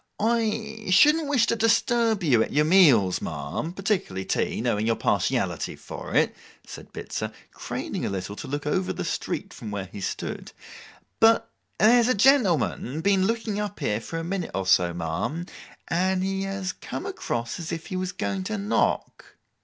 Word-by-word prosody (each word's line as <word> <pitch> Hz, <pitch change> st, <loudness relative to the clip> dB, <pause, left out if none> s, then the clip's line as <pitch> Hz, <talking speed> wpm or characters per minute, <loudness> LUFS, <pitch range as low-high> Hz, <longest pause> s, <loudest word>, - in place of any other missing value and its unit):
I 220 Hz, -1 st, -1 dB
shouldn't 300 Hz, -, +5 dB
wish 255 Hz, -5 st, +4 dB
to 230 Hz, -, +1 dB
disturb 225 Hz, -1 st, +2 dB
you 125 Hz, -8 st, +4 dB
at -, -, -1 dB
your 150 Hz, +1 st, +3 dB
meals, 140 Hz, -, +5 dB
ma'am, 80 Hz, -, -4 dB
particularly 185 Hz, -, -2 dB
tea, -, -, -1 dB
knowing 110 Hz, -2 st, 0 dB
your 115 Hz, -, +2 dB
partiality -, -, 0 dB
for -, -, -8 dB
it,' -, -, +3 dB, 0.3 s
said -, -, -11 dB
Bitzer, -, -, -5 dB, 0.2 s
craning -, -, -5 dB
a -, -, -1 dB
little 100 Hz, +1 st, -4 dB
to -, -, -7 dB
look 145 Hz, +2 st, -4 dB
over 185 Hz, +5 st, 0 dB
into -, -, 0 dB
the -, -, -4 dB
street -, -, -3 dB
from 110 Hz, -, -8 dB
where 100 Hz, -2 st, -4 dB
he 100 Hz, +1 st, -9 dB
stood; -, -, -5 dB, 0.7 s
'but 225 Hz, 0 st, +4 dB, 0.3 s
there's 230 Hz, +4 st, +5 dB
a 255 Hz, -, +3 dB
gentleman 190 Hz, -, +3 dB
been 195 Hz, +1 st, +3 dB
looking 225 Hz, -2 st, -1 dB
up 205 Hz, -1 st, -4 dB
here 110 Hz, -7 st, -1 dB
for 165 Hz, -, -6 dB
a 165 Hz, -, -3 dB
minute 180 Hz, +1 st, -3 dB
or 95 Hz, -, -1 dB
so, 90 Hz, -2 st, +4 dB
ma'am, 85 Hz, -, -3 dB, 0.4 s
and 185 Hz, +2 st, +1 dB
he 195 Hz, 0 st, -1 dB
has 195 Hz, -1 st, -3 dB
come 130 Hz, -, -7 dB
across 115 Hz, +6 st, -3 dB
as 165 Hz, -, -5 dB
if 165 Hz, 0 st, -4 dB
he 185 Hz, -, -5 dB
was 185 Hz, 0 st, -2 dB
going 190 Hz, 0 st, -3 dB
to 220 Hz, +1 st, -2 dB
knock. 200 Hz, +2 st, -1 dB
185 Hz, 175 wpm, -25 LUFS, -, 0.7 s, shouldn't